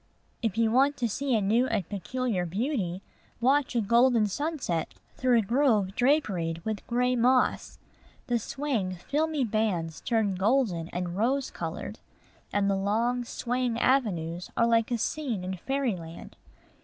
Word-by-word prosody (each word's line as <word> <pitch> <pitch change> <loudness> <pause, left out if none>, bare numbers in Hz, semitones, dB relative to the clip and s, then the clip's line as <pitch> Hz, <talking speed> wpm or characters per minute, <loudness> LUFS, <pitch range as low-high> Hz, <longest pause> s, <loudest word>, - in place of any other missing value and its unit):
If 225 -3 -1
you 225 -1 +3
want 275 +4 +3
to 240 - 0
see 260 +4 -1
a 215 - +2
new 225 +6 +2
and 210 -8 -1
peculiar 205 -1 -2
beauty, 195 - -2 0.4
watch 265 +2 +2
a 235 - +3
golden 235 +1 +4
sunset 255 - -2 0.2
through 250 -1 +3
a 225 - +3
grove 220 -4 +2
draperied 195 - +1
with 215 -2 -4
gray 250 +1 +1
moss. 250 +1 +2 0.5
The 240 -2 0
swaying, 225 -7 -2
filmy 295 - -1
bands 205 -8 -1
turn 220 -4 +1
golden 190 -4 +1
and 180 0 -4
rose 255 +6 0
colored; - - -6 0.5
and 205 -1 +1
the 200 - +2
long, 230 +5 0
swaying 245 0 -2
avenues 180 -10 0
are 230 - +4
like 230 -1 +2
a 240 - 0
scene 235 -4 -2
in 185 +1 -3
fairyland. 190 -9 -3
230 Hz, 145 wpm, -28 LUFS, 195-255 Hz, 0.5 s, golden